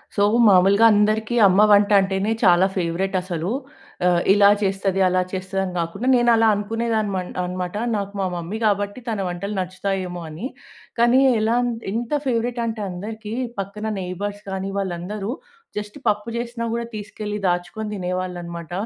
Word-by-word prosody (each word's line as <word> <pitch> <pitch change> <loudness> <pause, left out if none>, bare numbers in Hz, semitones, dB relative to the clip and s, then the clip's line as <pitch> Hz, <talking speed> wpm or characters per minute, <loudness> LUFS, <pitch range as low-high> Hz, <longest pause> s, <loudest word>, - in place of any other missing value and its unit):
So, 200 - +3 0.3
మామూలుగా 195 +3 +5
అందరికీ 215 +2 +1
అమ్మ 190 +2 +4
వంట 205 0 +5
అంటేనే 195 +2 -1
చాలా 180 -1 +6
ఫేవరెట్ 185 +2 -1
అసలు. 175 -1 -3 0.6
ఆహ్, 175 -1 +3
ఇలా 200 0 +6
చేస్తది, 195 -1 0
అలా 185 0 +2
చేస్తది 190 +1 -2
అని 185 -1 -4
గాకుండా 175 +8 -3
నేను 240 -1 +3
అలా 225 0 +4
అనుకునేదాన్ని 220 0 -1
మన్ 180 -1 -3
అనమాట. 180 +1 -4 0.2
నాకు 200 -1 -4
మా - - +1
మమ్మీ 175 +5 -4
గాబట్టి 205 +1 0
తన 220 -3 -2
వంటలు 200 +4 -4
నచ్చుతాయేమో 185 -1 -3
అని. 165 +11 -5 0.5
కానీ 240 +2 +5 0.2
ఎలా 225 +2 +2
అం 245 - 0 0.2
ఎంత 230 +2 -3
ఫేవరెట్ 240 -1 -1
అంటే 225 -1 -3
అందరికీ 210 +4 -6 0.3
పక్కన 200 +2 -4
నెయిబర్స్ 200 +3 -5
కానీ 190 0 -3
వాళ్ళందరూ, 195 +3 -4 0.5
జస్ట్ 210 0 -5
పప్పు 210 +2 0
చేసినా 235 0 -4
గూడా 235 +1 -1
తీసుకెళ్ళి 210 0 -5
దాచుకొని 175 +5 -2
తినేవాళ్ళనమాట. 180 -3 -4
200 Hz, 150 wpm, -22 LUFS, 180-215 Hz, 0.6 s, చాలా